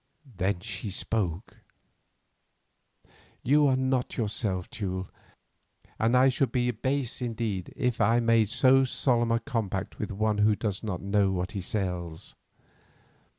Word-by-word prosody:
Then 95 0 0
she 105 0 -5
spoke: 95 -1 -3 1.9
"You 145 +3 +4
are 130 - +3
not 130 -1 -1
yourself, 100 -4 -1
Teule, 95 -5 -4 0.9
and 115 +3 +3
I 130 +1 +6
should 130 -1 +1
be 125 -1 +1
base 130 +2 -2
indeed 110 -6 -3
if 125 -4 -1
I 115 +2 +4
made 115 -3 +3
so 135 +3 +5
solemn 120 -2 +1
a 115 - +2
compact 115 -6 -3
with 105 - -3
one 105 +1 0
who 105 0 +4
does 100 -3 -2
not 100 -5 -4
know 100 0 +2
what 90 +1 -2
he 100 -3 -4
sells. 90 -4 -2
110 Hz, 135 wpm, -28 LUFS, 95-125 Hz, 1.9 s, I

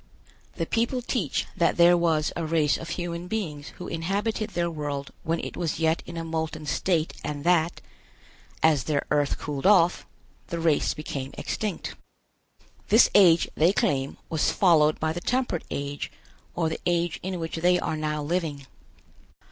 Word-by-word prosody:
The - - -2
people 235 +2 0
teach 215 - -1
that 170 - +2
there 175 0 +7
was 165 -3 +1
a 170 - -2
race 155 -2 +2
of 165 - -6
human 175 0 -4
beings 165 -9 -4
who 180 - -7
inhabited 200 +6 -2
their 175 -3 -1
world 145 -4 -4
when 165 +1 -1
it - - -6
was 170 -3 -2
yet 160 0 +2
in 170 - -7
a 165 - -3
molten 160 -1 -3
state 160 +3 0
and 145 -2 -4
that, 170 -1 +2 0.8
as 155 -4 +4
their 150 -2 0
earth 145 -1 +2
cooled 145 +3 -2
off, 180 -4 +4 0.4
the 170 - -4
race 165 -3 +2
became 140 -3 -5
extinct. 210 -5 -3 0.9
This 220 +3 +6
age, 175 -4 +6
they 170 +5 +3
claim, 135 -7 0
was 160 -2 +1
followed 155 -5 +4
by 160 0 0
the 175 - -5
Temperate 250 -6 -1
Age, 140 0 -4 0.4
or 165 -2 +1
the 160 - -4
age 170 -1 0
in 185 -1 -4
which 165 0 -4
they 180 +2 +3
are 160 - -2
now 150 -1 -2
living. 155 -3 -2
165 Hz, 165 wpm, -26 LUFS, 150-175 Hz, 0.9 s, there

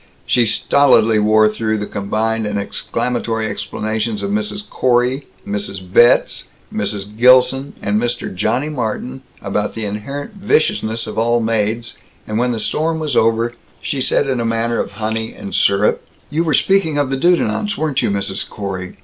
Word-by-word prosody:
She 120 -2 +3
stolidly 115 -2 +4
wore 110 +1 +4
through 110 0 -1
the 105 - -3
combined 110 +2 -1
and 105 0 -2
exclamatory 115 +2 -2
explanations 110 0 -3
of 100 - -2
Mrs. 105 - -2
Corey, 125 +2 +1 0.2
Mrs. 100 -1 -3
Betz, 120 +2 +4 0.3
Mrs. 105 0 -3
Gilson, 130 +3 +4
and 105 +1 +1
Mr. 120 -4 -2
Johnny 110 +9 0
Martin 130 -1 -4 0.2
about 105 +1 -2
the 110 -1 -3
inherent 110 +8 -5
viciousness 155 - 0
of 110 - -4
all 120 +1 +2
maids, 115 0 -1 0.3
and 110 +1 -2
when 125 +1 +1
the 115 -2 -2
storm 160 +8 0
was 155 -5 -2
over, 115 +1 +2 0.3
she 140 - -3
said 130 - +1
in 130 -2 0
a - - 0
manner 115 0 0
of - - -3
honey 110 +2 -3
and 100 - -8
syrup: 100 +1 +2 0.3
"You 160 +3 +1
were 155 -4 +2
speaking 190 -4 +2
of 145 -2 0
the - - +1
Dudenants, 175 - +1
weren't 155 -3 0
you, - - 0
Mrs. 100 -1 -2
Corey? 95 -3 -6
115 Hz, 165 wpm, -18 LUFS, 105-130 Hz, 0.3 s, stolidly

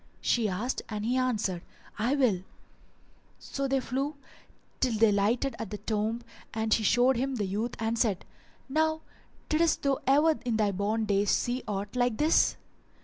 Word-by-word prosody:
she 225 -3 +1
asked 215 +8 -2
and 210 -1 -3
he 245 +2 +1
answered, 220 -9 0 0.4
"I 240 +6 +2
will." 240 -10 +2 1.0
So 275 0 -4
they 270 0 +1
flew 270 +4 -2 0.6
till 245 -4 +1
they 220 -1 +5
lighted 225 +7 +1
at 225 - -4
the 210 - -5
tomb 220 +2 -2 0.3
and 220 0 +1
she - - +2
showed 245 +4 +4
him 265 +2 -1
the 210 -4 -1
youth 215 +5 -2
and 225 +1 -1
said, 210 -6 +1 0.4
"Now 315 +3 +1 0.5
diddest 320 +1 +2
thou 275 -1 +1
ever 300 +4 +4
in 235 -3 0
thy 210 -2 +2
born 210 +3 -1
days 200 0 +1
see 245 +1 +1
aught 200 +2 -4
like 245 -2 +1
this?" 310 +2 +3
230 Hz, 165 wpm, -29 LUFS, 210-265 Hz, 1.0 s, they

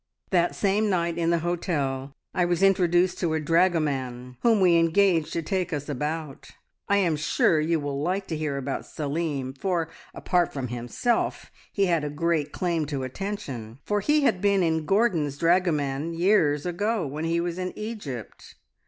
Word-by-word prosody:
"That 175 -2 +2
same 205 +2 +1
night 170 -2 0
in 165 0 +1
the 170 - +3
hotel 140 -6 -2 0.2
I 180 - +2
was 175 +2 +1
introduced 180 -1 +3
to 165 -3 0
a - - +1
dragoman, 145 -7 0
whom 230 -3 +4
we 180 -3 +5
engaged 165 0 +3
to 165 - -2
take 185 +1 -1
us 145 -2 -3
about. 150 0 -4 0.4
I 200 - +4
am 175 -5 +2
sure 150 +1 +2
you 160 +1 +1
will 145 -1 -3
like 185 +5 -1
to 160 - -1
hear 150 -2 -2
about 135 - -4
Salim, 145 -3 -3
for, 165 +3 -1 0.3
apart 180 -2 +1
from 130 -3 -4
himself, 120 - -1 0.2
he 200 - +2
had 170 -4 +1
a 150 - -2
great 155 0 0
claim 170 -4 -1
to 140 -3 -3
attention, 130 - -5
for 210 0 +1
he 300 +8 +2
had 185 -10 +2
been 170 -6 +2
Gordon's 180 -10 +1
dragoman 165 -3 +1
years 165 -5 +3
ago 205 +2 -1
when 150 +3 -4
he 165 +1 +1
was 175 +1 -3
in 185 0 -2
Egypt. 205 - -7
165 Hz, 170 wpm, -26 LUFS, 145-185 Hz, 0.4 s, we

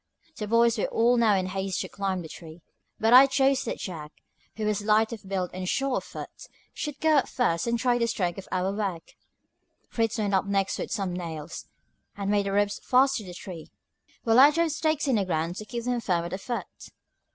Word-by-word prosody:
The 210 - -5
boys 230 +1 +3
were - - +1
now - - -1
all 235 +1 +3 0.2
in 185 - -1
haste 190 0 -2
to - - -4
climb 190 -2 -3
the - - -8
tree, 160 +1 -12 0.4
but 225 +2 +3
I 260 +2 +10
chose 270 0 +2
that - - -3
Jack, 155 -5 -7 0.4
who 215 - -3
was 210 -1 0
light 220 +2 +2
of 200 -4 -10
build 185 -2 -2
and 185 0 -4
sure 270 -1 0
of - - -3
foot, - - -10 0.3
should 295 -2 -5
go 315 -1 +4
up 270 - +2
first 170 -7 0
and 235 0 +1
try 245 0 +1
the 235 - +1
strength 180 -4 -1
of 190 - -10
our 185 +1 0
work. 195 -5 -4 0.8
Fritz 225 -1 -1
went 205 -2 -1
up 190 - +2
next 195 -1 0
with - - -4
some 195 -4 -2
nails, 165 -3 -6 0.5
and 200 0 -1
made 205 -1 +1
the - - -1
ropes 205 0 +1
fast 265 +2 +3
to 220 - -6
the 180 -2 -9
tree, 175 -3 -9 0.5
while 225 +1 +4
I 280 +2 +9
drove 330 +1 +1
stakes 310 -1 0
in 255 -4 +3
the 200 - +1
ground 170 0 -2
to 215 - -6
keep 235 +1 -5
them 245 0 -1
firm 175 -5 0
at 170 - -6
the 190 - -4
foot. 240 +3 -4
205 Hz, 225 wpm, -27 LUFS, 185-240 Hz, 0.8 s, I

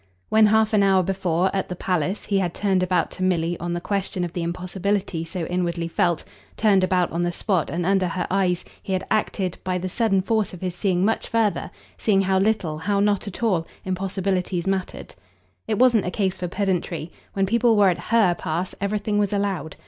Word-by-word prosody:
When 220 0 +6
half 220 +1 +3
an 210 - +4
hour 190 -1 +4
before, 190 0 0
at 195 - -1
the 180 - -4
palace, 180 +2 -1
he 200 -2 +1
had 175 -3 -1
turned 195 -3 +1
about 180 -2 +1
to 185 - -5
Milly 175 -2 +1
on 175 0 -3
the 175 - -1
question 190 -1 -2
of 175 -1 -4
the 175 - -3
impossibility 185 +1 -2
so 165 +1 -4
inwardly 175 -1 -1
felt, 170 0 0 0.3
turned 200 -4 +4
about 185 -1 +1
on 170 - -1
the 175 0 0
spot 185 -1 0
and 175 0 -2
under 190 -1 +2
her 180 +1 -2
eyes, 185 -2 +1 0.2
he 190 - -4
had 185 0 -1
acted, 195 -4 -1
by 185 -1 -1
the 185 +1 -3
sudden 195 -2 +1
force 220 -2 0
of 175 - -13
his 185 -2 -2
seeing 185 0 +1
much 225 - 0
further, 225 -3 0 0.3
seeing 195 -3 +3
how 190 0 +2
little, 195 -7 0
how 200 +4 0
not 205 0 +1
at 200 +4 -6
all, 180 -8 +1 0.2
impossibilities 185 -1 -1
mattered. 195 -1 -3 0.5
It 215 - 0
wasn't 240 -5 +4
a - - +1
case 190 -1 -1
for 180 - -3
pedantry; 175 -3 -2 0.2
when 195 -1 +1
people 230 +2 +3
were 200 -2 +6
at 175 - -1
HER 220 -6 +4
pass 170 +2 -3
everything 205 +1 0
was 205 -2 +1
allowed. 200 -6 -2
190 Hz, 205 wpm, -23 LUFS, 175-200 Hz, 0.5 s, When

